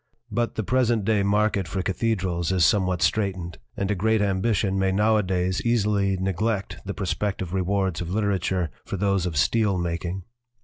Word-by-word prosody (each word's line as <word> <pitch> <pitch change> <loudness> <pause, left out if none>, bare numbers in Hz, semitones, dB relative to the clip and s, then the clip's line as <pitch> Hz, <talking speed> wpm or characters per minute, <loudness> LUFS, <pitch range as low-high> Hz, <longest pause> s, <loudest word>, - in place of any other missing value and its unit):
But 120 +2 -1
the 110 - -1
present 120 -2 +1
day 110 -1 +2
market 100 -1 +1
for 95 +2 -3
cathedrals 95 -4 -1
is 90 -3 +3
somewhat 90 -4 +2
straitened, 95 -5 -1 0.2
and 100 +1 -1
a - - +3
great 110 +3 +1
ambition 100 0 +1
may 95 0 +2
nowadays 95 -3 +1
easily 105 -4 +1
neglect 95 +3 -1
the 100 0 -5
prospective 95 -2 -2
rewards 95 -1 0
of 85 - -4
literature 95 -4 0
for 100 - -5
those 100 -2 +1
of 80 -4 -4
steel 100 +7 +2
making. 85 +2 -3
95 Hz, 160 wpm, -25 LUFS, 90-105 Hz, 0.2 s, is